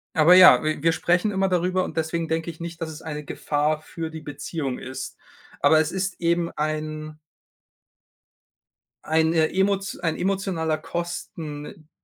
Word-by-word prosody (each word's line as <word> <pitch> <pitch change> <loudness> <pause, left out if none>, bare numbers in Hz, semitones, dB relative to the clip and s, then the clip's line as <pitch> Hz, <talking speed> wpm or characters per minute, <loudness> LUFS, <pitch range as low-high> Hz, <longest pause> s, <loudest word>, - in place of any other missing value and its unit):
Aber 160 +2 +6
ja, 185 -2 +9
w-wir 155 +1 +1
sprechen 175 +5 +1
immer 195 -1 +1
darüber 180 +1 +1
und - - -7
deswegen 160 +1 -1
denke 160 +1 -1
ich 165 0 -9
nicht, 170 -1 -6
dass 165 - -3
es 155 0 -9
eine 150 -2 -6
Gefahr 150 +2 -1
für 160 0 -6
die 160 0 -8
Beziehung 145 -2 -4
ist. 130 +1 -7 0.4
Aber 155 0 +5
es 160 +1 -2
ist 190 -1 -3
eben 170 0 +1
ein 155 0 -3 1.9
eine 160 0 +2
emot 195 +1 0
ein 165 -3 -1
emotionaler 185 -5 -1
Kosten, 155 -1 -6
160 Hz, 145 wpm, -24 LUFS, 155-175 Hz, 1.9 s, ja